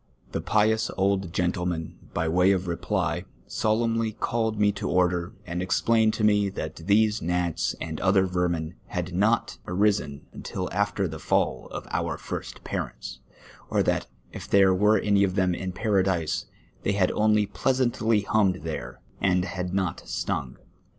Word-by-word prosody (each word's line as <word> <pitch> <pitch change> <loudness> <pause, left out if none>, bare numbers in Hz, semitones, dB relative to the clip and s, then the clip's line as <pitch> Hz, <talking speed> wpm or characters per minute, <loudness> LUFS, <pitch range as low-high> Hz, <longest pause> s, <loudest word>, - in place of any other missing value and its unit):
The - - -2
pious 110 +1 +2
old 95 -2 +1
gentleman, 90 -2 -2
by 80 +1 -1
way 90 +4 +4
of 95 -1 -1
reply, 85 -1 -1 0.2
solemnly 115 0 0
called 110 -1 -1
me 105 0 +4
to 100 - -4
order, 90 +1 +1
and 90 0 -3
explained 110 +4 +2
to 110 - -2
me 105 -1 +4
that 80 -5 -5
these 105 +5 +2
gnats 85 -1 0
and 80 -2 -5
other 95 0 +4
vermin 90 -3 -1
had 90 0 -4
not 110 +6 +1
arisen 90 -7 0
imtil 90 -1 -4
after 100 0 0
the 80 -1 -7
fall - - 0
of - - -7
our - - -1
first - - -6
parents, - - -5 0.5
or - - +2
that - - 0 0.2
if - - -8
there 95 -1 +5
were 105 +3 +4
any 100 -1 +3
of 95 -2 0
them 95 -2 +2
in 95 +1 -3
Paradise, 95 -6 0 0.3
they 100 - 0
had 95 -2 +2
only 105 0 +3
pleasantly 115 +1 +1
hummed 100 -4 +2
there, 80 -1 -5 0.2
and 90 -2 +2
liad 90 -2 -4
not 95 -2 -1
stung. 65 - -3
95 Hz, 155 wpm, -26 LUFS, 90-105 Hz, 0.5 s, there